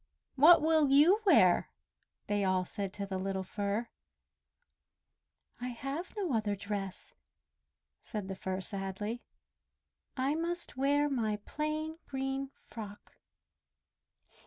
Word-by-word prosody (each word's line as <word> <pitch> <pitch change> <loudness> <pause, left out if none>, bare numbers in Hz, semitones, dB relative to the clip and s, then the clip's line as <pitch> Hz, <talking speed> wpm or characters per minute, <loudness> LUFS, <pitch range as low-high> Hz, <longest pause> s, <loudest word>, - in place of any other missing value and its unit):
"What 300 +4 +7
will 315 -2 +4
you 315 +10 +6
wear?" 185 - +5 0.6
they 205 -1 0
all 185 -1 +2
said 195 +1 -4
to 200 - -4
the 190 -1 -3
little 190 0 -2
Fir. 205 +4 -2 1.7
"I 245 - -3
have 275 - -5
no 370 -9 -1
other 215 -2 +1
dress!" 200 -1 -4 0.9
said 210 -3 -4
the 195 - -3
Fir 190 0 -3
sadly. 200 +4 -4 1.0
"I 265 +3 +1
must 340 +2 -2
wear 285 +2 +2
my 230 -7 0
plain 310 +1 -3
green 270 0 -2 0.2
frock." 210 -2 -9
235 Hz, 110 wpm, -32 LUFS, 200-295 Hz, 1.7 s, What